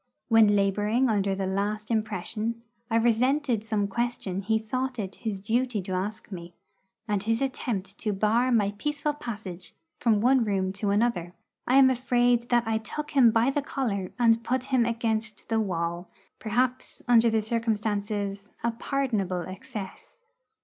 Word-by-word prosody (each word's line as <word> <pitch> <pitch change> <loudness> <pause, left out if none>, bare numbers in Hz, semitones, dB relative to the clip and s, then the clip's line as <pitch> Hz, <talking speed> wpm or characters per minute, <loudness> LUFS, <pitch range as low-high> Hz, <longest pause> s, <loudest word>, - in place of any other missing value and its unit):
When 220 -3 +6
labouring 210 +5 +2
under 200 -2 +1
the 195 0 -2
last 205 +3 -2
impression, 220 +1 -2 0.3
I 225 - 0
resented 240 +1 +2
some 215 -2 0
question 200 -3 -2
he 220 +3 +1
thought 255 +4 -3
it 195 -4 -4
his 215 -4 -4
duty 230 +3 0
to 190 - -6
ask 195 +4 -3
me, 170 -2 -8 0.5
and 205 -2 0
his 225 +2 0
attempt 215 -7 -3
to 215 - -1
bar 220 +5 +2
my 205 -4 +3
peaceful 295 +1 -1
passage 205 -9 -7 0.2
from 225 -4 +3
one 250 +3 +4
room 190 -3 0
to 200 +1 -2
another. 200 -5 0 0.3
I 255 - +3
am 265 -1 +7
afraid 245 -1 +2
that 240 -1 +3
I 220 0 0
took 300 +7 -6
him 265 -5 +6
by 225 +4 +3
the 290 - 0
collar 215 -10 -2
and 230 -1 +3
put 255 +1 0
him 240 -2 +4
against 220 -2 -2
the 225 -1 +2
wall 175 -3 -2 0.3
perhaps, 250 +4 -1
under 235 -1 +6
the 220 -1 +1
circumstances, 210 -3 -2
a 235 - +2
pardonable 225 -8 -1
excess. 190 - -8
220 Hz, 155 wpm, -27 LUFS, 200-240 Hz, 0.5 s, am